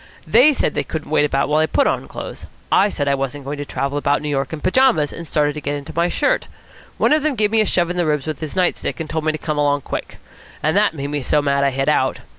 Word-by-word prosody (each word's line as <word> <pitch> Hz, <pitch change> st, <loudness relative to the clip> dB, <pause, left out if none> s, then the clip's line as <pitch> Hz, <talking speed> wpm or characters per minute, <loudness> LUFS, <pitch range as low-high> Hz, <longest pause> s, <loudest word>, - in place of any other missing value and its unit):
They 255 Hz, +7 st, +6 dB
said 280 Hz, -, 0 dB
they -, -, -1 dB
couldn't 155 Hz, -2 st, -6 dB
wait 150 Hz, -1 st, +3 dB
about 140 Hz, -1 st, 0 dB
while 150 Hz, +1 st, +2 dB
I 155 Hz, -, +3 dB
put 280 Hz, -, +2 dB
on -, -, -1 dB
clothes. -, -, -8 dB, 0.2 s
I 205 Hz, -, +4 dB
said 145 Hz, -7 st, -3 dB
I 140 Hz, -, +3 dB
wasn't 135 Hz, +1 st, -3 dB
going 145 Hz, +1 st, -5 dB
to 145 Hz, -, -4 dB
travel 140 Hz, +1 st, -2 dB
about 145 Hz, +1 st, +1 dB
New 150 Hz, -, -2 dB
York 135 Hz, -2 st, -1 dB
in 160 Hz, -, -5 dB
pyjamas, 185 Hz, -, +2 dB
and 170 Hz, -1 st, -8 dB
started 150 Hz, -1 st, +1 dB
to 150 Hz, -, -6 dB
get 145 Hz, +1 st, -2 dB
into 140 Hz, -1 st, -7 dB
my 170 Hz, +1 st, +2 dB
shirt. -, -, 0 dB, 0.5 s
One -, -, +3 dB
of 305 Hz, -, +3 dB
them 300 Hz, -2 st, 0 dB
gave 210 Hz, -2 st, +1 dB
me 220 Hz, -1 st, +4 dB
a 215 Hz, -, +1 dB
shove 175 Hz, -1 st, +1 dB
in 180 Hz, -, -4 dB
the 175 Hz, -, +1 dB
ribs 150 Hz, -3 st, 0 dB
with 155 Hz, -3 st, -4 dB
his 155 Hz, +1 st, -6 dB
night 185 Hz, -1 st, +2 dB
stick, -, -, -4 dB
and 160 Hz, -, -4 dB
told 160 Hz, 0 st, -3 dB
me 155 Hz, -, +3 dB
to 155 Hz, -, -4 dB
come 155 Hz, -1 st, -3 dB
along 145 Hz, -1 st, +2 dB
quick. -, -, -6 dB, 0.5 s
And 155 Hz, +3 st, +1 dB
that 205 Hz, -4 st, +3 dB
made 140 Hz, 0 st, -4 dB
me 145 Hz, -1 st, -1 dB
so 150 Hz, -, +1 dB
mad 140 Hz, -1 st, +1 dB
I 140 Hz, -, +3 dB
hit 135 Hz, 0 st, -2 dB
out." 130 Hz, -3 st, +2 dB
150 Hz, 290 wpm, -20 LUFS, 145-175 Hz, 0.5 s, They